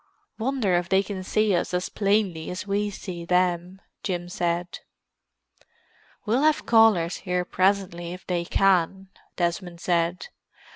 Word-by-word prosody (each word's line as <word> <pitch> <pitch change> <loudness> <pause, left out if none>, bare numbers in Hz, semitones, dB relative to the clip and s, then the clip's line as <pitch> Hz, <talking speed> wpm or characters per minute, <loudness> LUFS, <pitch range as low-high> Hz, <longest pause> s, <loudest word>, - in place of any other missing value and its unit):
"Wonder 235 -5 0
if 175 0 -2
they 190 +1 +3
can 195 -1 -5
see 215 +1 +2
us 175 +1 -1
as 180 - -1
plainly 200 -6 0
as 180 +2 -5
we 205 +1 0
see 185 -4 -7
them," 180 +1 0 0.2
Jim 175 -2 -3
said. 175 0 -2 1.5
"We'll 235 +5 +2
have 310 0 +2
callers 220 -7 +4
here 180 -1 -2
presently 185 -3 0
if 180 +1 -9
they 175 -2 -1
can," 190 0 +2 0.3
Desmond 175 0 -2
said. 175 +1 0
185 Hz, 135 wpm, -25 LUFS, 175-200 Hz, 1.5 s, callers